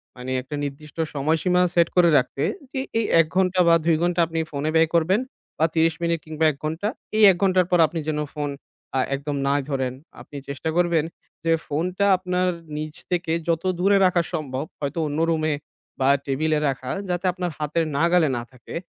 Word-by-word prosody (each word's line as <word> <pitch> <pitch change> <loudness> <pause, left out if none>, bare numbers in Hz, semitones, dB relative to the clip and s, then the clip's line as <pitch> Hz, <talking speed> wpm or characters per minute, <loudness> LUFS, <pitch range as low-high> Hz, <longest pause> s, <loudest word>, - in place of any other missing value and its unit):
মানে 125 +1 -6
একটা 140 +4 -7
নির্দিষ্ট 145 +2 -7 0.2
সময়সীমা 160 +5 +1
set 170 -1 +5
করে 175 -2 +6
রাখতে। 135 +1 -1 0.3
যে 265 - -3 0.2
এই 225 - 0
১ 165 - +6
ঘণ্টা 185 -1 +2
বা 170 - +7
২ 165 -1 +4
ঘণ্টা 175 0 +1
আপনি 165 0 -3
phone 140 0 -3
এ - - -1
ব্যয় 160 0 +4
করবেন 175 +5 +3 0.4
বা 160 - +3
৩০ 165 0 +3
মিনিট 170 0 +1
কিংবা 155 0 -1
১ 140 - -13
ঘণ্টা। 160 +6 -2 0.3
এই 220 - +4
১ 175 - -2
ঘণ্টার 185 -1 +3
পর 180 - +4
আপনি 165 0 -4
যেন 150 -1 -1
phone 145 -1 -2 0.4
আ - - +3 0.2
একদম 145 +1 -4
নাই 140 +1 +2
ধরেন। 130 -3 -1 0.3
আপনি 145 - -10
চেষ্টা 140 +3 -3
করবেন 170 -3 +2 0.4
যে 165 - +3
phone 160 +5 -1
টা 200 - +3
আপনার 180 0 -1 0.3
নিজ 155 0 -5 0.2
থেকে 175 -2 0
যত 165 -1 0 0.2
দূরে 200 +2 +4
রাখা 180 -1 +3
সম্ভব 140 -2 -3
হয়তো 145 +3 -3
অন্য 145 +1 -3
রুমে 155 -1 +1 0.5
বা 130 - +3 0.2
table 155 +3 0
এ - - +1
রাখা। 130 -1 -4 0.2
যাতে 180 +1 -2
আপনার 180 -1 -3
হাতের 155 +2 -1
নাগালে 170 0 +3
না - - -3
থাকে। 125 -2 -11
160 Hz, 195 wpm, -23 LUFS, 145-175 Hz, 0.5 s, বা